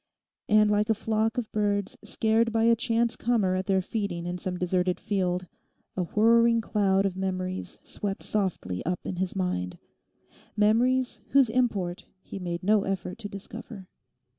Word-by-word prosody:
And 210 -1 +5
like 210 +1 +2
a 220 - +4
flock 220 +1 0
of 240 -3 -3
birds 205 -2 0
scared 225 +1 +1
by 225 0 +1
a 230 0 +5
chance 230 0 +1
comer 220 -6 +1
at 185 +1 -2
their 190 -1 +2
feeding 190 -5 -3
in 175 +1 -3
some 180 0 -3
deserted 180 0 0
field, 180 -3 -1 0.5
a 185 - -1
whirring 230 +3 +4
cloud 200 -3 +1
of 190 -2 -1
memories 185 -1 -3
swept 200 -1 -4
softly 185 - -2
up 180 +1 -2
in 185 - -4
his 185 +1 -2
mind—memories 210 - -1
whose 270 -4 +4
import 210 -8 -1 0.2
he 195 - -7
made 175 -1 -4
no 210 +2 +4
effort 195 +1 -3
to 205 -3 -6
discover. 200 -1 -9
200 Hz, 155 wpm, -27 LUFS, 185-225 Hz, 0.5 s, And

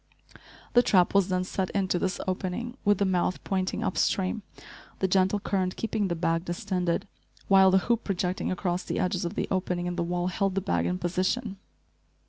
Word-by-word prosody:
The 245 - +7
trap 185 -7 +3
was 200 -2 +4
then 185 -1 0
set 185 0 -2
into 190 -3 +1
this 185 +1 -1
opening, 190 +6 -3
with 205 -1 +4
the 200 - +1
mouth 185 -1 0
pointing 190 +3 -1
up 190 -4 -1
stream, 190 +3 +1 0.6
the 190 - +1
gentle 190 +2 +2
current 185 -2 -1
keeping 220 -2 -1
the 170 - -1
bag 165 0 0
distended, 180 +1 -2 0.4
while 190 -1 +7
the 190 - +5
hoop 235 -1 +1
projecting 185 -2 -1
across 180 -1 -1
the - - -4
edges 180 0 0
of 170 - -4
the - - -1
opening 180 -2 -1
in 175 0 -3
the 170 - +1
wall 175 +1 -1
held 195 0 -1
the - - +2
bag 85 - 0
in 90 +1 -1
position. 190 - -1
185 Hz, 190 wpm, -27 LUFS, 180-195 Hz, 0.6 s, The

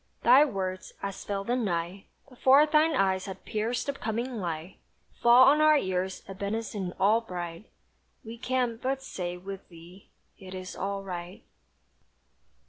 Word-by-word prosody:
Thy 255 +5 +8
words, 190 -7 -4
as 195 -1 -5
fell 200 -1 -3
the 240 +5 0
night, 190 -4 -2 0.2
Before 265 +2 +5
thine 310 +1 +3
eyes 190 -1 +1
had 190 - -8
pierced 225 +2 -2
the 280 - -2
coming 235 0 -3
light, 170 -2 -5 0.4
Fall 240 +2 +7
on 290 +3 +6
our 310 0 +6
ears 185 -4 -2
a 195 - -7
benison 200 -1 -3
all 215 +4 +4
bright; 175 -2 -7 0.5
We 230 +1 -9
can 250 -2 -1
but 270 +1 -2
say 180 -8 -5
with 195 +1 -9
thee 175 +3 -15 0.3
"it 185 -1 -9
is 185 0 -7
all 195 +1 -3
right!" 180 -1 -7
200 Hz, 150 wpm, -28 LUFS, 185-245 Hz, 0.5 s, Thy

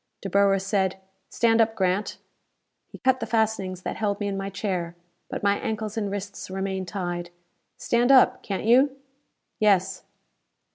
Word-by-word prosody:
Dr. 195 - -5
Boer 200 0 +4
said, 190 -1 0 0.3
"Stand 230 -1 +3
up, 225 0 +1
Grant." 190 +1 0 0.7
He - - -12
cut 260 0 +2
the - - -4
fastenings 210 -5 -1
that - - -4
held 205 -2 -1
me 205 - -2
in 200 - -2
my 195 0 -3
chair. 180 -4 -3 0.3
But - - -5
my 200 0 +2
ankles 215 -1 -3
and 210 -3 -2
wrists 200 -1 -6
remained 190 0 -3
tied. 175 -1 -4 0.5
"Stand 240 +2 +2
up, 265 -2 +5
can't 195 0 -4
you?" 260 +4 +4 0.6
"Yes." 195 -3 +2
200 Hz, 155 wpm, -25 LUFS, 190-220 Hz, 0.7 s, up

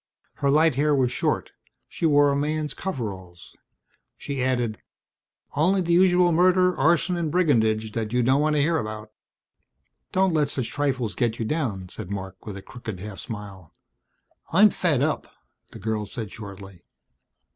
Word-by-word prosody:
Her 140 - +1
light 155 +2 +4
hair 145 +3 +2
was 130 -3 +2
short, - - -1 0.4
she 165 - -1
wore 145 -1 +5
a - - 0
man's 150 +1 -1
coveralls. 95 - -6 0.6
She 140 -2 -4
added, 120 -4 -1 0.7
"Only 185 +6 +3
the 170 -1 0
usual 180 0 +5
murder, 180 +2 +4
arson 170 +5 +2
and 165 -2 -1
brigandage 110 -11 +2
that 110 -1 -3
you 125 0 +2
don't 130 +4 +3
want 155 0 +2
to 145 - +3
hear 165 +2 +2
about." 110 0 -6 1.0
"Don't 190 -1 +2
let 150 -2 +2
such 130 -4 -3
trifles 130 -7 -1
get 120 -2 -1
you 115 - -2
down," 110 - -2
said 100 -1 -8
Marc 95 -1 -7
with 100 -2 -5
a 95 - -10
crooked 115 -7 -8
half 100 0 -8
smile. 100 -7 -8 0.8
"I'm 205 +5 +6
fed 150 -7 +1
up," 155 +1 -2 0.4
the - - -11
girl 110 -1 -3
said 110 -3 -6
shortly. 100 -4 -10
130 Hz, 160 wpm, -25 LUFS, 110-155 Hz, 1.0 s, I'm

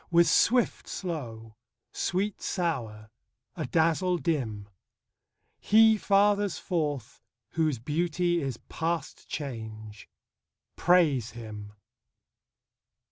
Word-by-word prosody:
With 170 0 +5
swift, 245 0 +3
slow; 115 - -6 0.3
sweet, 195 +3 -2
sour; 115 - -3 0.4
adazzle, 170 +2 +1
dim; 120 - -2 0.9
He 220 +1 +6
fathers 205 -1 +2
forth 145 - -3 0.3
whose 155 -4 +1
beauty 170 +6 0
is 135 -4 -3
past 165 -2 -3
change: 110 -6 -7 0.7
Praise 150 -11 +3
him. 105 -3 -9
160 Hz, 80 wpm, -28 LUFS, 115-180 Hz, 0.9 s, He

